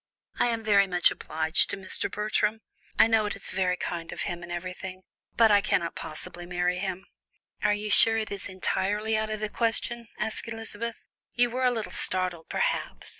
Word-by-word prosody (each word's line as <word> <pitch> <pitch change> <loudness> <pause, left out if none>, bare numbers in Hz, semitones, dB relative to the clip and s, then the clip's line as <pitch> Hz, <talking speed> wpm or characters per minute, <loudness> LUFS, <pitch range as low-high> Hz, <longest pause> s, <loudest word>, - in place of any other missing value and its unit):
"I - - +4
am 230 -1 -1
very 200 -2 +4
much 180 -1 +3
obliged 160 +1 +1
to 200 - -2
Mr. 190 -1 -2
Bertram 215 +1 0 0.4
I - - +7
know 225 -2 +2
it 205 - -3
is - - -2
very 185 -1 0
kind 170 -2 -4
of - - -4
him, 175 0 -4
and 175 0 -9
everything, 185 +1 -6 0.3
but 225 -2 +6
I 205 -1 +6
cannot 170 -5 0
possibly 175 +3 -8
marry 180 0 0
him." 190 0 -4 0.6
"Are 210 0 +3
you 210 0 -4
sure 225 +2 +8
it 220 -1 -3
is 200 0 -5
entirely 205 +3 -1
out 215 0 -1
of 215 -1 -4
the 215 - 0
question?" 235 +1 -2
asked 220 +2 +1
Elizabeth. 225 0 -4 0.4
"You 245 -1 +3
were 255 +1 0
a - - +6
little 225 -3 -3
startled, 180 -3 0
perhaps. - - -2
205 Hz, 190 wpm, -27 LUFS, 180-220 Hz, 0.6 s, sure